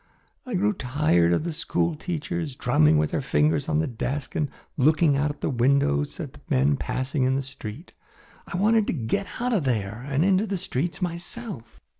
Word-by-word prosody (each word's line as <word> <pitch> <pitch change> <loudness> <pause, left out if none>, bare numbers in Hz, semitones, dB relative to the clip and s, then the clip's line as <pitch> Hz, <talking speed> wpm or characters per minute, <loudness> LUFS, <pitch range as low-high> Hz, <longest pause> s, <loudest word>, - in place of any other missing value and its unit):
I 245 - -2
grew 210 +3 +2
tired 125 - +2
of 85 - +2
the 170 -1 -3
school 165 +1 0
teachers, 165 -2 -4
drumming 80 -13 +4
with 75 0 +1
their - - 0
fingers 145 +2 +1
on 155 - +2
the 160 - +2
desks 135 +2 -3
and 150 -2 0 0.3
looking 155 +2 +4
out 145 +2 +1
at 145 - -7
the - - 0
windows 120 - +2
at - - -7
men 70 +3 +3
passing 130 - -2
in 130 +1 +3
the 135 - -1
street. 130 - -9 0.5
I 180 - -4
wanted 215 +2 +3
to - - 0
get 155 - -1
out 245 +1 0
of 195 -8 +2
there 110 -3 -1
and 140 +4 +2
into 195 +2 +3
the 195 -1 -1
streets 170 0 -2
myself." 175 - -5
145 Hz, 190 wpm, -25 LUFS, 125-175 Hz, 0.5 s, drumming